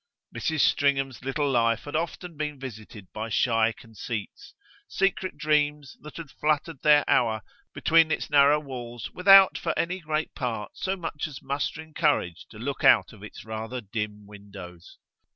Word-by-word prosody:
Mrs. 160 -3 -1
Stringham's 135 -3 +1
little 140 +2 -1
life 115 -2 +2
had 145 - -7
often 170 +1 -3
been 150 -1 -4
visited 110 -6 -9
by 110 +1 -5
shy 115 0 +2
conceits 115 - -8 0.3
secret 195 -1 -1
dreams 150 -2 0
that 150 - -11
had 160 -5 -8
fluttered 150 -1 -1
their 150 -1 +5
hour 110 -3 +2 0.3
between 165 0 +3
its - - -2
narrow 145 0 +5
walls 120 -5 -7
without, 195 +1 +7
for - - -2
any 180 +2 -1
great 155 -2 -3
part, 115 -6 -4
so 190 0 -2
much 160 -4 -4
as 145 -4 -10
mustering 150 +3 -4
courage 145 - 0
to 110 - -13
look 135 +5 -5
out - - +5
of 105 - -15
its 105 - -11
rather 110 +3 -5
dim 105 -1 -5
windows. 100 -4 -12
135 Hz, 155 wpm, -26 LUFS, 110-155 Hz, 0.3 s, without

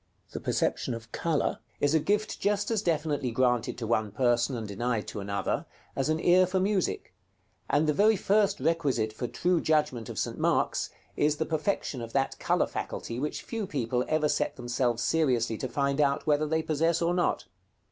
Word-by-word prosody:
The - - -5
perception 120 - -1
of 115 -1 -10
color 165 -3 0 0.2
is 145 +1 +2
a 160 - +5
gift 210 +6 0
just 205 +2 0
as 220 -3 +1
definitely 150 -6 0
granted 120 -1 +1
to 120 - -4
one 110 -2 0
person, 120 +3 +1
and 110 -2 -5
denied 115 +2 -2
to - - -6
another, 100 0 -2 0.3
as 135 +2 0
an 155 0 +1
ear 180 +2 +5
for 185 +1 0
music; 195 -1 -1 0.6
and 145 +2 +3
the 150 - +2
very 215 +7 +4
first 205 +1 +2
requisite 135 -10 0
for 120 +3 -4
true 170 +8 +1
judgment 150 -8 +1
of - - -7
St. - - -2
Mark's, - - +1 0.3
is 150 0 +2
the 160 - -1
perfection 155 -5 -1
of 115 0 -7
that 135 -1 0
color - - +2
faculty 115 +1 -5
which 150 +3 -3
few 225 -4 -4
people 125 -4 -1
ever 155 -1 +2
set - - 0
themselves 120 -1 -1
seriously 125 -8 +1
to 130 - -2
find 140 +2 0
out 140 -1 +1
whether 150 0 +2
they 160 +1 0
possess 165 +2 +1
or 170 +1 +2
not. 175 0 0
145 Hz, 190 wpm, -28 LUFS, 120-170 Hz, 0.6 s, a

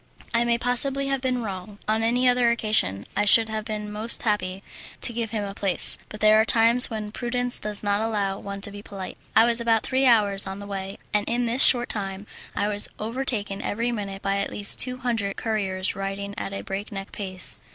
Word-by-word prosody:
I 235 0 +2
may 235 0 +1
possibly 265 +3 +1
have 270 -1 -1
been 255 -2 -2
wrong. 200 0 -7
On 220 +1 0
any 245 +3 +1
other 245 -1 +3
occasion 215 - 0
I 205 - +1
should 225 +2 +6
have 220 0 -4
been 210 -2 -5
most 215 +2 -2
happy 195 -3 -2 0.4
to 240 - +2
give 230 -1 -3
him 215 -2 -3
a 200 -1 -6
place, 195 -3 +1
but 215 - -10
there 215 0 +5
are - - +2
times 230 +2 +4
when 215 -2 -6
prudence 245 +1 +1
does 210 0 -3
not 205 0 0
allow 205 -3 -2
one 200 0 -7
to 205 - 0
be 205 0 -10
polite. 195 -2 -9 0.2
I 225 - +6
was 235 0 +1
about 225 -2 +1
three 265 0 +1
hours 205 -5 +2
on 190 0 -6
the 200 - -9
way, 195 -1 -6 0.2
and 210 0 0
in 240 +1 0
this 240 +3 +4
short 245 -1 +7
time 195 -1 -5 0.3
I 205 - -1
was 205 -1 -3
overtaken 220 -3 -2
every 230 +3 -2
minute 200 -4 -6
by 195 0 -1
at 200 - -2
least 205 -1 +4
two 255 0 +1
hundred 225 -6 -3
couriers 195 -4 -2
riding 195 +1 -5
at - - -5
a 195 - -6
breakneck 195 0 -7
pace. 185 - +5
215 Hz, 215 wpm, -24 LUFS, 200-235 Hz, 0.4 s, short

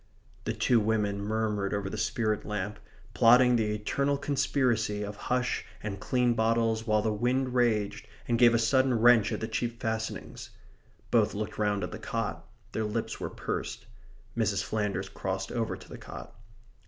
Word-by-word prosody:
The - - -1
two 120 - +3
women 105 -2 0
murmured 105 -1 -1
over 100 -1 -2
the 95 - -5
spirit 110 -2 0
lamp, 105 0 -4 0.3
plotting 125 +1 +6
the 105 -2 +1
eternal 140 +7 0
conspiracy 130 -7 0
of 105 0 -5
hush 125 0 0 0.2
and 100 -2 -4
clean 125 +3 +2
bottles 115 0 +1
while 110 -1 +3
the 110 - +1
wind 125 +4 0
raged 115 -5 +1 0.2
and 115 -1 +1
gave 120 -1 +7
a - - +5
sudden 130 +3 +3
wrench 120 -1 +6
at - - -3
the 110 - -2
cheap 115 +1 -3
fastenings. 110 -1 -4 0.6
Both - - +3
looked 105 +1 -4
round 105 -2 +1
at 90 - -4
the 105 - -7
cot. 105 -7 -3 0.2
Their 110 - -1
lips 110 +2 -3
were - - -3
pursed. - - -4 0.5
Mrs. 105 -4 +1
Flanders 105 -3 -2
crossed 95 0 -4
over 115 -2 -2
to - - -15
the - - -9
cot. - - -9
110 Hz, 165 wpm, -29 LUFS, 105-120 Hz, 0.6 s, gave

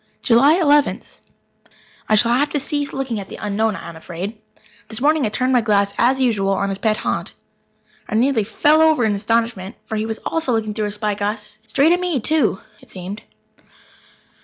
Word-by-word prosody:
July 265 +5 +5
Eleventh. 295 -5 +1 0.9
I 215 - +5
shall 230 +2 +4
have 285 +4 +2
to 295 - -1
cease 290 0 -3
looking 260 -5 -3
at 195 - -8
the - - -8
Unknown, 210 +1 -1
I - - -8
am 170 - -9
afraid. 185 +6 -7 0.5
This 220 +1 -5
morning 295 -1 +2
I - - -2
turned 255 +4 0
my 245 - +4
glass, 200 -2 +1
as 260 +3 +3
usual, 210 -6 +1
on 200 +1 -1
his 195 0 -4
pet 215 -1 +1
haunt. - - -3 0.8
I - - -2
nearly 240 -1 +2
fell 300 +9 +3
over 315 -7 +4
in 215 - +2
my 205 - -1
astonishment, 225 -2 -1
for 220 - -5
he 215 +1 -2
was 220 0 -4
also 325 -6 -1
looking 220 -2 -1
through 215 0 -2
a - - -4
spyglass 210 0 -3
straight 280 +8 +3
at 355 - +3
me, 355 -6 -1
too, 255 -6 +1 0.2
it - - -19
seemed. 190 +3 -7
225 Hz, 195 wpm, -20 LUFS, 205-270 Hz, 0.9 s, July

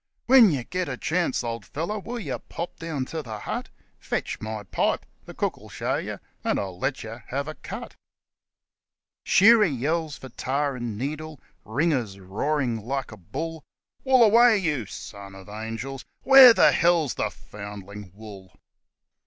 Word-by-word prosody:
( - - -50
When 250 -4 +8
yer 140 -7 -1
get 180 +3 -3
a 130 - -4
chance, 165 -5 0
old 115 -1 -4
feller, 170 +9 -4
will 240 +5 -6
yer 140 - -4
pop 170 +1 -7
down 160 -5 -3
to 160 +4 -5
the 110 -6 -7
hut? - - -5 0.3
'Fetch - - -3
my 110 -1 -5
pipe 95 - -1 0.2
the - - -11
cook - - -1
'11 - - -14
show - - -2
yer - - -5 0.2
and - - +1
I'll 95 -3 -5
let 140 +6 -2
yer 115 +2 -9
have 140 +3 -3
a 155 - -4
cut.' - - -8 1.3
Shearer 220 +3 +7
yells 155 +1 -1
for 130 - -10
tar 140 +3 -1
and 120 -4 -4
needle. 155 +3 -5 0.2
Ringer's 120 - -1
roaring 115 +4 -1
like 135 +2 -3
a 105 - -10
bull: 155 - -6 0.4
1 260 -1 +4
Wool - - +8
away, 230 +1 +6
you 150 - -1
(son 100 -1 -9
of 95 0 -12
angels). 115 +5 -6 0.2
Where 270 -2 +10
the - - +6
hell's 170 -5 +3
the - - -1
(foundling) 100 -1 -10
WOOL 100 -4 -12
135 Hz, 170 wpm, -25 LUFS, 110-165 Hz, 1.3 s, Where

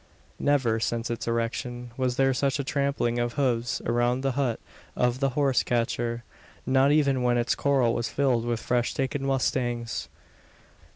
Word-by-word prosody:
Never, 130 -6 +2
since 115 +1 -2
its 120 - -4
erection, 120 +1 -3
was 130 -1 0
there 135 0 +3
such 135 +1 0
a 140 - -2
trampling 140 -4 0
of 120 0 -1
hoofs 125 -3 0
around 120 +2 +1
the 135 0 0
hut 125 -3 -1 0.4
of 125 0 +1
the 135 0 +2
horse 140 -3 +3
catcher 120 0 -1 0.4
not 135 +2 +4
even 140 -4 +3
when 120 -1 +2
its 120 0 +1
corral 135 -5 +2
was 120 - -2
filled 130 -5 +1
with 120 -1 -1
fresh 120 0 0
taken 135 0 -2
mustangs. 125 -3 -1
125 Hz, 160 wpm, -26 LUFS, 120-135 Hz, 0.4 s, not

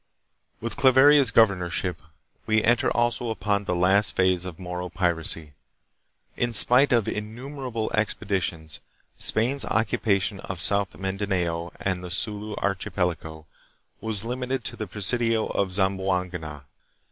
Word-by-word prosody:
With 115 0 -5
Claveria's 135 0 +6
governorship 90 -6 +1 0.5
we 110 0 +2
enter 120 0 +2
also 120 0 0
upon 100 -2 -1
the 90 - -1
last 95 +4 +3
phase 90 -1 +1
of 90 -3 -7
Moro 90 -1 -6
piracy. 80 -4 -1 0.8
In 120 -1 -1
spite 125 +6 +6
of 120 -4 +2
innumerable 120 +2 -5
expedi 105 -2 -1
tions, 80 -2 -5 0.4
Spain's 125 +6 +3
occupation 100 -2 0
of 95 -3 -7
South 100 +3 +1
Mindanao 95 -4 -2
and 95 -1 -2
the 90 - -7
Sulu 105 +3 -2
archipelago 90 -5 -3 0.5
was 110 -1 -1
limited 125 0 -3
to - - -3
the 110 - -6
presidio 110 +3 +1
of 95 -2 -2
Zamboanga. 90 -5 -2
100 Hz, 125 wpm, -25 LUFS, 90-115 Hz, 0.8 s, Claveria's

